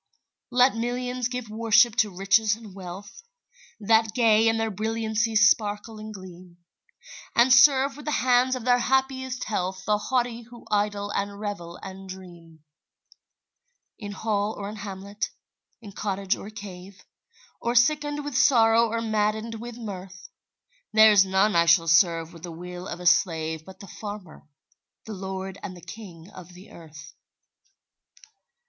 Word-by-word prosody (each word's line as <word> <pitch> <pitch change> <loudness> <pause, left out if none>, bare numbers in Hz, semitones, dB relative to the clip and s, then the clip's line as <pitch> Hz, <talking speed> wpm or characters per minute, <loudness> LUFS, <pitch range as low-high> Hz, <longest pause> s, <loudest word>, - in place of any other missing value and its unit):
Let 250 +1 +4
millions 245 +1 -2
give 250 -2 -5
worship 225 +1 +3
to 220 -3 +3
riches 200 +3 +2
and 220 -3 -13
wealth, 190 +1 -10 0.6
That 220 +1 +2
gay 225 -2 +4
in 225 0 +2
their 225 -1 -1
brilliancy 220 +2 -1
sparkle 215 0 +2
and 215 0 -8
gleam, 180 -3 -12 0.8
And 245 +2 +5
serve 270 +1 +5
with 295 - -11
the 300 - -1
hands 255 +1 +3
of 250 -2 -7
their 245 -1 +4
happiest 260 0 -1
health 185 -3 -3
The 210 0 +1
haughty 240 -1 -1
who 240 +1 -15
idle 205 -1 -1
and 200 0 -3
revel 200 -5 -6
and 190 0 -9
dream; 170 -4 -12 1.4
In 205 -1 -7
hall 210 0 -2
or 200 - -5
in 215 - -8
hamlet, 200 0 -5 0.5
in 205 - -10
cottage 195 0 -2
or 200 - -9
cave, 195 -2 -11 0.6
Or 235 +1 -1
sickened 290 +3 +2
with 290 -3 -5
sorrow 230 -3 +4
or 230 +1 -2
maddened 220 0 -1
with 240 0 -8
mirth, 195 - -9 0.6
There's 215 -2 +6
none 190 +1 +2
I 170 0 +4
shall 165 0 +5
serve 165 0 +3
with 165 - -13
the 175 0 -7
will 180 +2 -8
of 170 - -6
a 180 - -9
slave 160 -2 +1
But 190 0 -13
the 200 - -11
farmer, 205 -6 -9 0.6
the 220 - -7
lord 190 0 -6
and 185 -3 -7
the - - -13
king 175 -2 -11
of 180 -2 -13
the 185 +3 -15
earth. 155 -3 -13
210 Hz, 150 wpm, -25 LUFS, 185-230 Hz, 1.4 s, There's